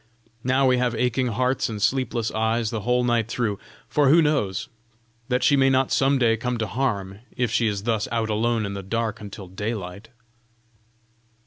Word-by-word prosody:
Now 130 +2 +2
we 125 -1 +3
have 125 -1 0
aching 125 +2 0
hearts 125 +3 0
and 110 -2 -5
sleepless 120 0 0
eyes 110 0 0
the 115 - -2
whole 125 +3 +1
night 120 -2 +1
through; 115 -4 -2 0.3
for 140 +3 +2
who 165 +4 +6
knows, 145 - 0 0.6
that 125 -1 0
she 145 - +5
may 135 -1 +4
not 130 0 +2
some 135 +1 +3
day 115 -3 +3
come 125 +2 -2
to 110 - -1
harm, 100 -5 -2 0.2
if 120 -3 0
she 115 -1 +2
is 100 -2 -2
thus 110 -1 0
out 115 -2 -1
alone 115 +1 0
in 100 - -4
the 100 - -5
dark 110 +3 -3
until 100 -2 -9
daylight." 100 +1 -5
115 Hz, 185 wpm, -24 LUFS, 105-125 Hz, 0.6 s, who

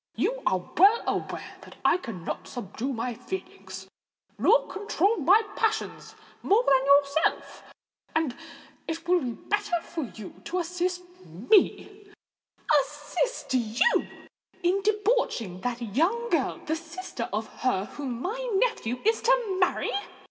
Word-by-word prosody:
You - - 0
are 185 - +3 0.2
well 405 +7 +6
aware - - -3
that - - -13
I - - +5
cannot 220 - -6
subdue 245 +3 -5
my 245 0 -2
feelings, 380 - -7 0.5
nor - - +5
control 410 +1 0
my 385 +8 +5
passions 440 -1 -1 0.3
more 430 +5 +3
than 270 - +4
yourself; 280 +2 +2 0.5
and 315 -6 +1 0.5
it 330 +1 -5
will 360 0 +4
be 245 -2 -3
better 410 - -1
for 325 -4 -4
you 215 -4 -11
to 360 - -2
assist 360 +1 -1 0.2
me——" 400 - +1 0.7
"Assist 295 - -3
you 240 - +2 0.6
in 370 +3 +2
debauching 415 - 0
that 245 +1 -3
young 465 - +1
girl—the 320 - 0
sister 335 -6 -6
of 215 +2 -1 0.2
her 205 -7 +1
whom 255 -1 -5
my - - -3
nephew 385 - 0
is 445 +1 +3
to 475 -6 +2
marry!" 365 - +1
345 Hz, 125 wpm, -27 LUFS, 250-415 Hz, 0.7 s, well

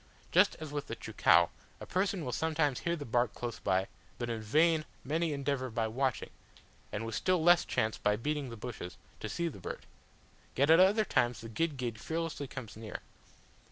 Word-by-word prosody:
Just - - +5
as 155 -2 -6
with 145 -1 -3
the 115 - -4
cheucau, 85 -7 +4 0.3
a - - -7
person 185 -3 0
will 125 - -2
sometimes 155 -2 +1
hear 170 0 0
the 145 -3 -6
bark 120 0 +1
close 120 -2 -4
by, 95 -1 +1 0.3
but 120 -1 -3
in 115 -1 -3
vain 155 +8 +3 0.2
many 160 +4 0
endeavour 140 -2 -1
by 115 -1 -1
watching, 130 +3 -1 0.6
and 110 +2 -3
with 115 - -5
still 180 - +1
less 175 +1 +6
chance 110 0 0
by 105 0 +2
beating 145 +4 -2
the 115 - -8
bushes, 105 -6 -7 0.2
to 110 - -4
see 170 +7 -1
the 140 -11 -6
bird; - - -6 0.7
yet 140 +4 +4
at 165 - +8
other 205 +4 +5
times 120 - +1
the 115 - -8
guid 150 +5 -1
guid 120 -3 -3
fearlessly 160 -3 -3
comes 115 -6 -8
near. 110 -1 -7
130 Hz, 195 wpm, -32 LUFS, 115-160 Hz, 0.7 s, at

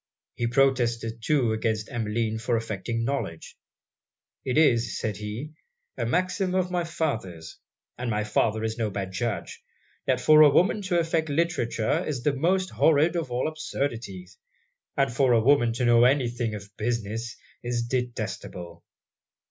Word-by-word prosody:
He 120 - -2
protested 120 -3 +1
too 130 -3 +2
against 110 +1 -2
Emmeline 110 -1 -1
for 120 0 0
affecting 115 +1 -3
knowledge 115 -12 -4 0.9
'It 130 +2 -1
is,' 120 -8 +3
said 105 -3 -3
he, 105 +8 -6 0.4
'a 120 -3 -2
maxim 180 - 0
of 185 -1 0
my 175 -1 0
father's 115 - -4 0.4
and 125 -1 -2
my 105 -1 0
father 110 +1 0
is 110 +1 -3
no 110 -2 0
bad 95 -1 -4
judge 115 +3 -4 0.4
that - - +2
for 155 0 +6
a 150 - +9
woman 185 +8 +3
to 185 -3 0
affect 165 -1 0
literature 155 -2 0
is 135 -8 -4
the 150 - +2
most 185 +7 +1
horrid 160 +2 +3
of 165 -6 -2
all 125 +3 -1
absurdities; 115 - -4 0.6
and 135 -3 +2
for 125 0 +3
a 115 - +5
woman 120 0 +4
to 125 +1 -1
know 120 0 +5
any 130 -1 +3
thing 120 -2 -3
of 100 0 -10
business, 115 0 -3 0.2
is 120 -1 -2
detestable!' 110 -8 -4
120 Hz, 155 wpm, -26 LUFS, 110-145 Hz, 0.9 s, a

